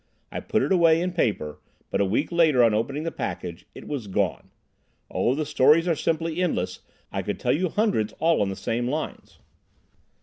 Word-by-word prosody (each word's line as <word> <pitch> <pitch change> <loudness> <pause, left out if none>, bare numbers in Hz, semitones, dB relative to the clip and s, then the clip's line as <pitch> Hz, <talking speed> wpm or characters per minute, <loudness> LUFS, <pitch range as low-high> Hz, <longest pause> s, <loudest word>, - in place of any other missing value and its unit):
I - - -3
put - - 0
it - - -1
away 165 -3 +5
in 180 +1 -1
paper, 105 - -1 0.3
but - - +1
a - - +3
week 110 - 0
later, 160 -7 +4
on 115 -2 +4
opening 135 +8 -1
the 165 - -2
package—it 85 -2 -6
was 135 -8 -4
gone! 95 -1 -1 0.6
Oh, 125 - +1
the 155 +1 -1
stories 150 +3 +4
are 170 - +2
simply 165 +2 -1
endless. 90 - -1 0.3
I - - -2
could - - -4
tell - - +1
you 180 +4 0
hundreds 200 - +1
all 165 -4 +2
on 100 - +1
the 95 - -4
same 120 +5 -2
lines." 150 +4 -4
150 Hz, 190 wpm, -25 LUFS, 105-165 Hz, 0.6 s, away